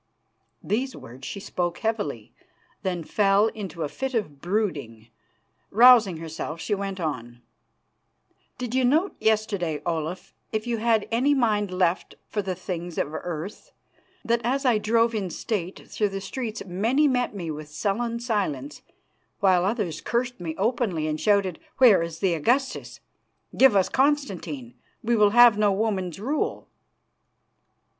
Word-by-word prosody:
These 255 Hz, +5 st, -1 dB
words 130 Hz, +3 st, -10 dB
she 200 Hz, -, -5 dB
spoke 175 Hz, -3 st, -3 dB
heavily, 205 Hz, -, -3 dB, 0.5 s
then 180 Hz, -3 st, -2 dB
fell 200 Hz, +4 st, +3 dB
into 190 Hz, -7 st, -6 dB
a -, -, -1 dB
fit 265 Hz, -, -4 dB
of 150 Hz, -11 st, -3 dB
brooding. 150 Hz, -, -2 dB, 0.6 s
Rousing 230 Hz, -5 st, +6 dB
herself, 160 Hz, 0 st, -6 dB
she 210 Hz, -, -2 dB
went 195 Hz, -1 st, -3 dB
on: 120 Hz, -7 st, -5 dB, 1.1 s
"Did 245 Hz, -2 st, -5 dB
you 260 Hz, 0 st, +2 dB
note 310 Hz, +10 st, +2 dB
yesterday, 205 Hz, -8 st, 0 dB
Olaf, 165 Hz, +1 st, -3 dB, 0.2 s
if 220 Hz, 0 st, -2 dB
you 240 Hz, -1 st, -1 dB
had 225 Hz, -1 st, +2 dB
any 265 Hz, +5 st, +3 dB
mind 210 Hz, -6 st, +1 dB
left 180 Hz, -1 st, 0 dB
for 210 Hz, -, -2 dB
the 190 Hz, -2 st, -3 dB
things 175 Hz, -2 st, -6 dB
of 150 Hz, -, -1 dB
earth, 175 Hz, +4 st, -6 dB, 0.5 s
that 235 Hz, 0 st, +1 dB
as 270 Hz, +4 st, 0 dB
I 235 Hz, -4 st, +4 dB
drove 230 Hz, +2 st, +2 dB
in 200 Hz, -4 st, -2 dB
state 185 Hz, -1 st, -4 dB
through 210 Hz, -2 st, -1 dB
the 195 Hz, 0 st, -4 dB
streets 220 Hz, +2 st, -5 dB
many 225 Hz, +11 st, +2 dB
met 250 Hz, -5 st, 0 dB
me 170 Hz, -5 st, -4 dB
with 150 Hz, 0 st, -7 dB
sullen 225 Hz, +9 st, -2 dB
silence, 185 Hz, -, -2 dB, 0.6 s
while 185 Hz, -3 st, +4 dB
others 195 Hz, -6 st, -1 dB
cursed 245 Hz, 0 st, -2 dB
me 165 Hz, -2 st, -4 dB
openly 210 Hz, -7 st, 0 dB
and 155 Hz, 0 st, -2 dB
shouted, 200 Hz, -5 st, +2 dB, 0.2 s
'Where 240 Hz, -9 st, +7 dB
is 165 Hz, -1 st, -4 dB
the 190 Hz, -3 st, +2 dB
Augustus?' 250 Hz, -, -1 dB, 0.5 s
'Give 260 Hz, -5 st, +6 dB
us 190 Hz, -2 st, +4 dB
Constantine. 195 Hz, -, -1 dB, 0.3 s
We 235 Hz, +1 st, +2 dB
will 210 Hz, -2 st, +5 dB
have 235 Hz, -1 st, +7 dB
no 210 Hz, -1 st, +4 dB
woman's 195 Hz, -4 st, -1 dB
rule. 275 Hz, +9 st, -2 dB
200 Hz, 145 wpm, -25 LUFS, 170-235 Hz, 1.1 s, Where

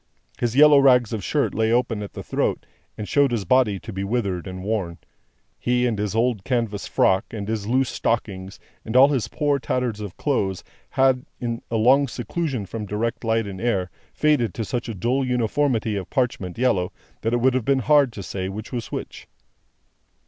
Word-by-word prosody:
His 120 Hz, -1 st, -1 dB
yellow 150 Hz, 0 st, +8 dB
rags 125 Hz, -4 st, +4 dB
of 105 Hz, -4 st, -3 dB
shirt 145 Hz, +6 st, 0 dB
lay 110 Hz, 0 st, +1 dB
open 120 Hz, -3 st, +1 dB
at 100 Hz, -, -7 dB
the -, -, -7 dB
throat, -, -, -1 dB, 0.3 s
and 105 Hz, -, -5 dB
showed 140 Hz, -1 st, +3 dB
his 115 Hz, -5 st, -2 dB
body 115 Hz, -1 st, +3 dB
to 110 Hz, -, -8 dB
be 95 Hz, +1 st, -3 dB
withered 100 Hz, -5 st, -2 dB
and 95 Hz, 0 st, -7 dB
worn. 95 Hz, -5 st, -2 dB, 0.6 s
He, 125 Hz, 0 st, +1 dB
and 115 Hz, -4 st, -1 dB
his 105 Hz, 0 st, -2 dB
old 115 Hz, -3 st, +1 dB
canvas 115 Hz, -4 st, -1 dB
frock, 95 Hz, 0 st, +2 dB
and 105 Hz, -3 st, -6 dB
his 110 Hz, -2 st, -3 dB
loose 130 Hz, +2 st, +2 dB
stockings, 95 Hz, -4 st, -2 dB, 0.2 s
and 110 Hz, -, -6 dB
all 135 Hz, +2 st, +8 dB
his 135 Hz, -6 st, 0 dB
poor 145 Hz, -2 st, 0 dB
tatters 125 Hz, -4 st, -2 dB
of 105 Hz, -3 st, -7 dB
clothes, 100 Hz, -10 st, -1 dB, 0.3 s
had, 130 Hz, -1 st, +2 dB
in 115 Hz, -1 st, -3 dB
a 115 Hz, -, -2 dB
long 135 Hz, +5 st, +4 dB
seclusion 130 Hz, -1 st, -3 dB
from 105 Hz, +2 st, -6 dB
direct 110 Hz, +5 st, -2 dB
light 115 Hz, -1 st, +1 dB
and 95 Hz, -2 st, -7 dB
air, 100 Hz, -6 st, 0 dB, 0.2 s
faded 145 Hz, -, +1 dB
down 115 Hz, -, -3 dB
to -, -, -5 dB
such 120 Hz, +2 st, -3 dB
a 115 Hz, -, -4 dB
dull 125 Hz, +8 st, 0 dB
uniformity 125 Hz, -2 st, 0 dB
of 95 Hz, -3 st, -6 dB
parchment 120 Hz, -9 st, -1 dB
yellow, 105 Hz, -7 st, +1 dB, 0.3 s
that 115 Hz, +1 st, -1 dB
it -, -, +3 dB
would 130 Hz, +2 st, +3 dB
have 130 Hz, -2 st, 0 dB
been 135 Hz, +3 st, +2 dB
hard 145 Hz, -4 st, +5 dB
to 100 Hz, -, -7 dB
say 95 Hz, +2 st, -4 dB
which 105 Hz, +3 st, -7 dB
was 120 Hz, -3 st, -4 dB
which. -, -, -6 dB
115 Hz, 200 wpm, -23 LUFS, 100-130 Hz, 0.6 s, yellow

